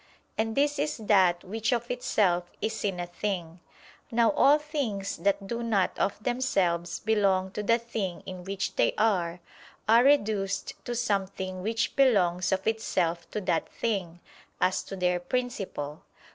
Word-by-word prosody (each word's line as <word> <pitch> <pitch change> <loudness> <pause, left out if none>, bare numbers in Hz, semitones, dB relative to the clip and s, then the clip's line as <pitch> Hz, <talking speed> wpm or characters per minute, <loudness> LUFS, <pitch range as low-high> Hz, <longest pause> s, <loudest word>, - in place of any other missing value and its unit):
And 220 0 -1
this 290 +1 +2
is 295 0 -1
that 190 -5 +3
which 220 +5 -2
of 240 0 -1
itself 205 -8 +1
is 220 0 -2
in 195 -3 -1
a 175 - -2
thing. 175 -2 -4 0.5
Now 235 -1 +3
all 295 0 +5
things 280 -11 -3
that 200 0 0
do 235 +4 -3
not 215 -6 +1
of 205 +2 -1
themselves 185 -9 0
belong 195 -3 +2
to 210 - -4
the 230 +3 +3
thing 220 -6 -4
in 185 -1 -7
which 195 +1 -3
they - - +3
are, 180 -5 +1 0.5
are 230 +2 +6
reduced 210 -8 +2
to 240 - -3
something 195 -5 -2
which 225 +3 -1
belongs 185 -10 +3
of 190 0 0
itself 170 -6 0
to - - -3
that 175 -4 0
thing, 185 -7 -2 0.4
as 185 +1 +2
to 195 - -6
their 180 -1 +1
principle. 185 - -3
200 Hz, 155 wpm, -28 LUFS, 180-230 Hz, 0.5 s, are